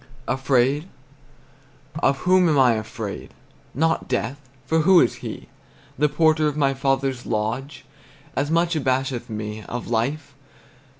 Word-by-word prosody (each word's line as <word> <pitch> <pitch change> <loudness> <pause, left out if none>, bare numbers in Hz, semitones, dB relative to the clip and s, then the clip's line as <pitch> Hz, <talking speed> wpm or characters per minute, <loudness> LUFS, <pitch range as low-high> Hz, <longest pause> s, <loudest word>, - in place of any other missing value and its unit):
Afraid? 135 +4 +1 1.1
Of 135 - +2
whom 180 -1 +4
am 150 - +2
I 130 -3 +5
afraid? 110 -1 -6 0.4
Not 160 +4 +1
death; 125 +3 -2 0.2
for 160 +5 +1
who 175 +3 +6
is - - +2
he? - - -8 0.5
The 150 +3 +2
porter 155 +1 +3
of 150 0 -2
my 140 -2 +2
father's 135 -1 -1
lodge 115 +6 -3 0.5
As 145 +1 0
much 170 +1 +2
abasheth 130 -3 -1
me. 105 0 -5
Of 120 -1 -6
life? 140 +6 -1
135 Hz, 130 wpm, -23 LUFS, 120-155 Hz, 1.1 s, who